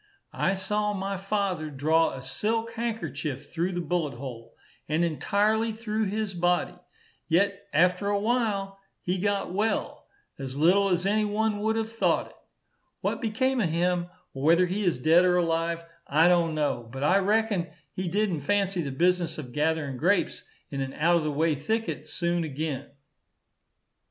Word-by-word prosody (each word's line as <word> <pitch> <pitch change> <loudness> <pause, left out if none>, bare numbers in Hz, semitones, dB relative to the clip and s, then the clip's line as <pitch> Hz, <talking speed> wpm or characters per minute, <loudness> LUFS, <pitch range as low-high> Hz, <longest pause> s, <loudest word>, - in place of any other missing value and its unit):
I 190 - +1
saw 210 +2 -1
my 195 0 -3
father 195 -5 -1
draw 155 +4 +2
a 130 - -7
silk 225 +9 -1
handkerchief 160 - -4
through 175 +3 -1
the 175 - -2
bullet 165 -4 -1
hole, 120 -3 -8 0.3
and 160 +3 +2
entirely 210 +7 +1
through 220 0 -2
his 205 0 -2
body; 175 0 +1 0.5
yet 200 +4 +1
after 180 +5 +3
a 205 0 +1
while 205 -4 0 0.2
he 180 +1 -1
got 200 -2 -1
well, 215 +3 -1 0.3
as 135 -1 -5
little 185 +7 +4
as 180 0 +1
any 210 +2 +2
one 210 0 0
would 220 +1 +1
have 225 0 -2
thought 225 - +1
it. - - -22 0.7
What - - -1
become 255 +3 +1
of 180 - +1
him, 175 +1 +1 0.3
or 135 - -6
whether 170 +5 +5
he 190 +4 -2
is 175 -7 +2
dead 160 +7 +5
or 180 -1 +3
alive, 165 0 0 0.2
I 155 +4 +4
don't 170 -3 +3
know; 125 -6 -1
but 135 +2 -5
I 185 +7 +4
reckon 205 -2 +1 0.3
he 185 0 -3
did'ent 190 -3 0
fancy 195 +2 +1
the 145 - -3
business 175 +4 +1
of 135 -5 -7
gathering 150 -3 0
grapes 180 +7 +1 0.3
in 140 -1 -3
an 135 0 -3
out 170 +3 +3
of 165 - -1
the 155 - -1
way 160 +2 +2
thicket 220 +11 -2
soon 175 -1 -1
again. 150 -2 -4
180 Hz, 165 wpm, -27 LUFS, 155-205 Hz, 0.7 s, whether